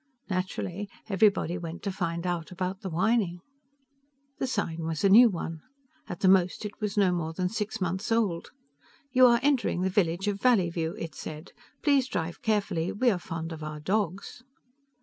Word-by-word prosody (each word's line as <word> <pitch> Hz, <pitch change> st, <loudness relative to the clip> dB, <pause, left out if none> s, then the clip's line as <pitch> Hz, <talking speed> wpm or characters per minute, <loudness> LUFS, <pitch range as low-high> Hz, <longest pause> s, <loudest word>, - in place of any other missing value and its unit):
Naturally 185 Hz, +1 st, -3 dB, 0.2 s
everybody 195 Hz, -4 st, +2 dB
went 170 Hz, +1 st, -7 dB
to 200 Hz, -, -1 dB
find 170 Hz, -2 st, -3 dB
out 175 Hz, -3 st, -2 dB
about 185 Hz, +1 st, -3 dB
the 195 Hz, -, -4 dB
whining. 185 Hz, +1 st, +1 dB, 1.0 s
The 265 Hz, -, 0 dB
sign 170 Hz, -9 st, -2 dB
was 160 Hz, +1 st, -3 dB
a 195 Hz, -, +5 dB
new 230 Hz, +4 st, +8 dB
one. 165 Hz, -4 st, -5 dB, 0.5 s
At 175 Hz, -, -6 dB
the 190 Hz, -, +4 dB
most 185 Hz, +1 st, +3 dB
it 210 Hz, -, -7 dB
was 210 Hz, 0 st, -2 dB
no 195 Hz, -3 st, +4 dB
more 165 Hz, -2 st, -2 dB
than 180 Hz, +2 st, -1 dB
six 220 Hz, +1 st, -3 dB
months 185 Hz, +4 st, -2 dB
old. 210 Hz, -7 st, +1 dB, 0.6 s
YOU 255 Hz, -1 st, +7 dB
ARE 235 Hz, -1 st, +5 dB
ENTERING 270 Hz, -10 st, +2 dB
THE 190 Hz, -, 0 dB
VILLAGE 185 Hz, -1 st, +1 dB
OF 200 Hz, -1 st, -1 dB
VALLEYVIEW, 175 Hz, -8 st, +2 dB
it 165 Hz, -6 st, -6 dB
said. 155 Hz, +3 st, -8 dB, 0.3 s
PLEASE 280 Hz, -4 st, +3 dB
DRIVE 170 Hz, -9 st, -4 dB
CAREFULLY 205 Hz, -7 st, 0 dB
WE 245 Hz, +3 st, +3 dB
ARE 185 Hz, -, -1 dB
FOND 165 Hz, -1 st, -5 dB
OF 160 Hz, -1 st, -7 dB
OUR 155 Hz, 0 st, -5 dB
DOGS. 195 Hz, +5 st, -2 dB
185 Hz, 175 wpm, -28 LUFS, 170-210 Hz, 1.0 s, new